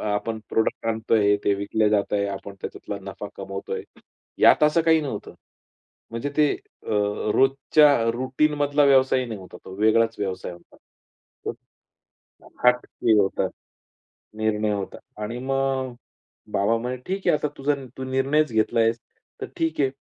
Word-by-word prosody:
आपण 110 +2 -2
प्रॉडक्ट 110 0 0
आणतोय, 110 -2 +2
ते 100 - +3
विकले 105 +2 +1
जात 105 -1 +1
आहे. 100 -1 +1
आपण 100 0 -6
त्याच्यातला 100 - -6
नफा 100 +2 -7
कमवतोय. 95 0 -5 0.6
यात - - +6
असं 150 +2 +5
काही 160 0 +4
नव्हतं. 135 -9 -6 0.8
म्हणजे 115 +5 -3
ते 150 -2 +4 0.4
अ, - - -8 0.5
रोजच्या 135 -2 +4
रूटीनमधला 145 +3 +1
व्यवसाय 130 -1 +4
नाही 110 -4 -6
होता. 95 - -11
तो 95 - -9
वेगळाच 115 +1 +3
व्यवसाय 95 -3 -3
होता. 85 0 -16 1.9
हटके 125 -2 +3
होता. 95 -1 0 0.9
निर्णय 110 -1 0
होता. 100 -2 -4 0.2
आणि 115 +3 -4
मग 135 -1 -1 0.6
बाबा 100 +4 +2
म्हणे, 125 +2 -3
"ठीक 190 +1 -3
आहे, - - +5
आता 150 - -2
तुझा 145 +2 +1 0.2
तू 130 - -4
निर्णयच 135 +3 +1
घेतला 110 +1 +2
आहेस, 115 +1 +2 0.4
तर - - -3
ठीक 160 -2 -1
आहे. 135 -2 +3
115 Hz, 140 wpm, -24 LUFS, 105-135 Hz, 1.9 s, यात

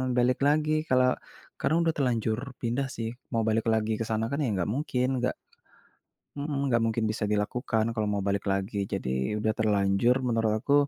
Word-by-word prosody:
balik 125 +1 +2
lagi 155 +1 +2 0.2
kalau 130 -1 +4 0.5
karena 155 - +1
udah 165 -1 +2
terlanjur 115 -5 0 0.2
pindah 125 +3 -1
sih 115 -4 -4 0.2
mau 115 -2 +1
balik 110 +1 +1
lagi 110 0 +1
ke - - 0
sana 110 0 0
kan 140 - -1
ya - - +1
nggak 95 +2 -1
mungkin, 130 -3 0
nggak 125 +1 0 1.0
mhm, 140 -1 -2
nggak 115 -2 +3
mungkin 115 0 0
bisa 110 -1 -1
dilakukan 110 +2 0
kalau 110 -2 -1
mau 100 -1 0
balik 100 0 0
lagi. 100 +1 -1
Jadi 65 +10 -1
udah 110 +1 +1
terlanjur 105 +2 +2
menurut 115 -2 +1
aku, 140 - +1
115 Hz, 175 wpm, -28 LUFS, 105-125 Hz, 1.0 s, kalau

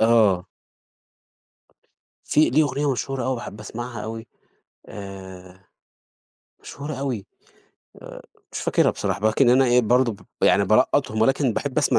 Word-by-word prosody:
آه. 105 -5 +3 1.8
فيه 155 -4 +3
ليه 155 +3 +4
أغنية 140 +1 -1
مشهورة 130 0 -3
أوي 130 0 0
باحب 110 -3 -8
أسمعها 115 +1 -7
أوي، 115 0 -7 0.6
آآ 95 -2 -10 1.0
مشهورة 145 +2 -7
أوي، 130 -7 -4 0.8
آآ - - -10 0.3
مش - - -4
فاكرها - - +2
بصراحة، 100 - -3
ولكن 120 +3 +3
أنا 130 +2 +5
إيه 125 0 +4
برضو 120 +1 +2
ب 100 - -13 0.2
يعني - - +4
بالقّطهُم 110 0 +2
ولكن 135 0 +2
باحب 145 +4 -2
أسمع 150 - +3
120 Hz, 130 wpm, -23 LUFS, 105-135 Hz, 1.8 s, أنا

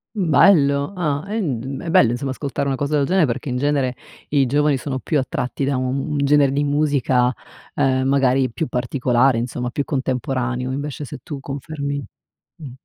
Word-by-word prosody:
Mhmm, 185 -6 -1
bello 140 0 +4
ah 150 -4 -1
ehm, 135 - -3
è 165 - -4
bello 120 - +5
insomma 130 +2 -3
ascoltare 140 +1 -3
una 135 - 0
cosa 145 +2 0
del 140 - +2
genere, 180 -2 +3
perché 130 +4 -3
in 125 - -1
genere 140 -2 0 0.3
i 140 -3 +2
giovani 145 +1 +2
sono 130 +1 -4
più 150 +1 0
attratti 130 +1 -2
da 140 -1 0
un 130 +1 -1
un 150 - -1
genere 145 -1 +4
di 145 +2 0
musica, 140 -4 +2 0.4
ehm, 130 -2 +1
magari 135 -2 +2
più 155 +6 -3
particolare 125 0 +1
insomma, 125 +1 -3
più 140 +3 -2
contemporaneo, 130 -1 -2
invece 145 +1 -4
se 130 - -8
tu 145 -5 -6
confermi 140 0 -5 0.5
mh. 145 -6 -9
140 Hz, 180 wpm, -21 LUFS, 130-145 Hz, 0.5 s, bello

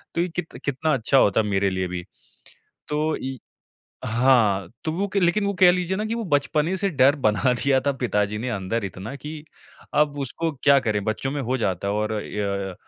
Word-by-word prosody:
तो 170 - +2
ये 180 - -1
कित 165 -7 -5
कितना 145 +3 0
अच्छा 135 +2 +2
होता 105 -2 +4
मेरे 100 -1 +1
लिए 95 -1 -2
भी। 90 0 -5 0.9
तो 155 +1 0
ये 130 0 -5 0.7
हाँ, 115 -6 +3 0.2
तो 155 - -1
वो 195 +4 -1
क - - +3
लेकिन 190 +3 +2
वो 200 - 0
कह 180 -1 +8
लीजिए 180 +1 -1
ना 215 - -1
कि 225 - -2
वो 230 -1 -3
बचपने 155 +2 +1
से 200 - +1
डर 140 -1 +4
बना 110 +5 +2
दिया 135 -1 +3
था 140 - +3
पिताजी 105 -3 0
ने 125 +3 -3
अंदर 100 +1 -2
इतना 95 +7 -7
कि 150 +1 -8 0.5
अब 145 -1 +2
उसको 165 +5 -2
क्या 140 -1 +7
करें, 105 -4 -1
बच्चों 110 +5 -2
में 145 - -2
हो 130 +2 -1
जाता 95 -3 -1
है 100 - 0
और 105 +1 -1
य 100 -2 -3
130 Hz, 205 wpm, -24 LUFS, 105-155 Hz, 0.9 s, कह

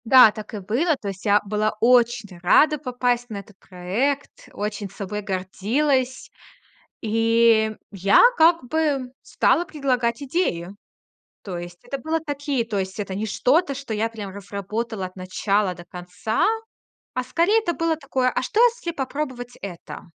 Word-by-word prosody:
Да, 250 -2 +8
так 215 +1 -9
и 210 - -4
было. 250 - +1
То 205 - -5
есть 195 +1 -8
я 205 0 +5
была 210 +1 0
очень 235 -4 +3
рада 300 - +5
попасть 245 -2 -1
на 215 - -5
этот 200 0 -11
проект, 215 +11 -3
очень 205 -1 -4
собой 200 +2 -5
гордилась. 235 +8 -1 0.7
И 225 0 +3 0.2
я 195 0 +4 0.2
как 330 -1 +5
бы 285 -5 0
стала 345 - +2
предлагать 255 -8 -1
идеи. 260 - -1 0.7
То 185 -3 -6
есть 175 0 -8
это 275 - -4
было 315 +4 -1
такие 285 -5 -2
То 215 -3 -2
есть 190 +2 -3
это 195 -2 -4
не 205 +3 -2
что-то, 280 - +2
что 270 -4 -5
я 220 +2 0
прям 210 -3 -7
разработала 200 +1 -4
от 185 - -14
начала 185 +1 0
до 175 0 -12
конца, 180 +3 -2 0.7
а 255 - -1
скорее 340 - +2
это 345 -6 -2
было 330 -1 0
такое: 265 -4 0
"А - - -1
что, 420 - +1
если 475 -8 +1
попробовать 260 -4 -4
это?" 180 -4 -8
230 Hz, 155 wpm, -23 LUFS, 200-275 Hz, 0.7 s, Да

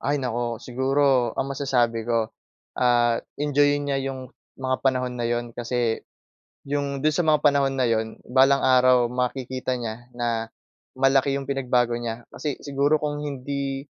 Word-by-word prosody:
Ay, 145 +2 0
naku, 120 -2 -2
siguro 130 0 +2
ang 135 - -2
masasabi 120 -5 0
ko, 115 -2 0 0.5
ah, 120 -1 +3 0.2
enjoyin 145 0 +2
niya 140 -1 0
'yong 130 -1 -6 0.3
mga 130 -1 -1
panahon 125 -1 +1
na 120 - -1
'yon 120 0 -2
kasi, 120 -1 -1 0.7
'yong 140 -1 -2
do'n 155 0 +3
sa 175 - +1
mga 155 -1 +4
panahon 140 -2 +3
na 130 -2 +1
'yon 110 -1 +1 0.2
balang 135 +2 +4
araw 125 -2 +4
makikita 130 0 -2
niya 120 0 -6
na, 115 -2 -1 0.5
malaki 135 +1 +3
'yong 140 0 -5
pinagbago 125 -3 +1
niya 120 0 -5
kasi 150 -2 -4
siguro 145 +2 +1
kung 150 -1 -2
hindi 140 0 -3
130 Hz, 150 wpm, -24 LUFS, 120-140 Hz, 0.7 s, mga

